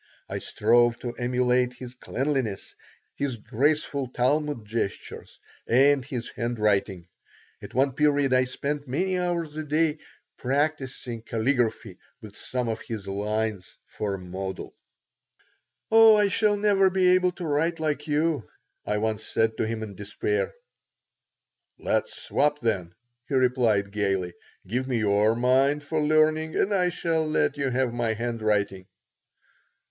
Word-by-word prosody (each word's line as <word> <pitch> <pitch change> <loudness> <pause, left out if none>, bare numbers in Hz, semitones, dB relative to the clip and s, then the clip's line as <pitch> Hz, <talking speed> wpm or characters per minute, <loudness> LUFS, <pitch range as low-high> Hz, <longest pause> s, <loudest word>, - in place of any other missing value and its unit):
I - - -4
strove 120 0 +3
to 120 -1 -4
emulate 125 +1 +1
his 125 0 -9
cleanliness, 130 -4 -3 0.4
his 140 -3 -2
graceful 140 +4 0
Talmud 130 0 0
gestures, 110 -2 -5 0.3
and 135 +3 +4
his 125 -3 -5
handwriting. 105 -6 -1 0.5
At - - -10
one 135 +2 +3
period 145 -1 +2
I 130 0 +4
spent 145 +3 -4
many 180 +8 0
hours 170 -4 -2
a 155 - -2
day 155 +1 +1 0.4
practising 130 -3 -2
caligraphy 115 -3 -1 0.2
with 105 -4 -12
some 125 -1 -3
of 110 -1 -3
his 110 -4 -6
lines 105 -1 -3
for 100 -2 -3
a - - -6
model 95 +1 -6 1.2
"Oh, 225 -1 +8
I 205 -1 +3
shall 205 +1 +2
never 200 -2 +4
be 185 -1 +3
able 180 0 +3
to 175 - -6
write 160 +3 0
like 150 -1 -2
you," 150 -4 0 0.3
I 105 - -1
once 110 0 -1
said 110 0 0
to - - 0
him, 110 0 -3
in 105 -2 -7
despair 420 - -2 1.3
"Let - - 0
us - - -11
swap, 150 0 0
then," 95 - -2 0.3
he 140 - -2
replied, 120 -6 +2
gaily.. 95 -4 -1 0.3
"Give 125 +7 -2
me 125 -3 0
your 105 +1 +3
mind 135 +4 +2
for 155 +2 -1
learning 155 +1 +2
and 205 - +1
I 180 -2 +2
shall 165 -2 -1
let 155 - +1
you 140 -2 -1
have 125 -1 0
my 120 -2 0
handwriting." 110 -5 -1
125 Hz, 140 wpm, -26 LUFS, 110-150 Hz, 1.3 s, Oh